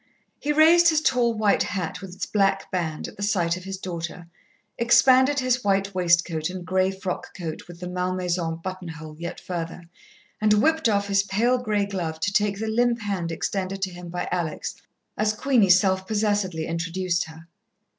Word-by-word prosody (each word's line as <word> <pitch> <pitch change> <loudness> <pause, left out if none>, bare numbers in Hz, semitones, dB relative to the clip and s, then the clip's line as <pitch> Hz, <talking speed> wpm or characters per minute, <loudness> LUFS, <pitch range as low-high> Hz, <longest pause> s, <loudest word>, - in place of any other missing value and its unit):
He 295 - -1
raised 330 +3 +6
his 315 -2 +3
tall 245 -6 +2
white 215 -2 +2
hat 185 -2 -3
with 190 -2 -9
its - - -3
black 195 -2 +1
band, 165 -4 -2
at - - -12
the - - -8
sight 180 -5 +1
of 180 0 -9
his 195 0 -5
daughter, 175 -2 -6 0.5
expanded 260 +4 +5
his 255 0 +1
white 195 0 +1
waistcoat 170 -2 +2
and 180 -1 -7
grey 185 +1 +2
frock 190 -1 -5
coat 165 -4 -6
with 175 -1 -11
the 180 - -4
malmaison 180 -2 -1
buttonhole 165 -4 -7
yet 170 +1 -5
further, 170 -1 -5 0.6
and 215 0 +4
whipped 315 +5 +3
off 200 -1 +1
his 195 -1 +3
pale 230 +6 +1
grey 210 -4 0
glove 175 -5 -4
to 200 - 0
take 205 -1 +2
the 220 - -3
limp 235 +1 +1
hand 190 -5 -2
extended 190 +3 -3
to 190 - -1
him 175 0 -9
by 175 +1 -3
Alex, 170 -4 -2 0.5
as 215 0 +2
Queenie 230 -3 +2
self 190 +1 +4
possessedly 205 -6 0
introduced 170 +1 -1
her. 160 +1 -13
190 Hz, 175 wpm, -24 LUFS, 175-210 Hz, 0.6 s, raised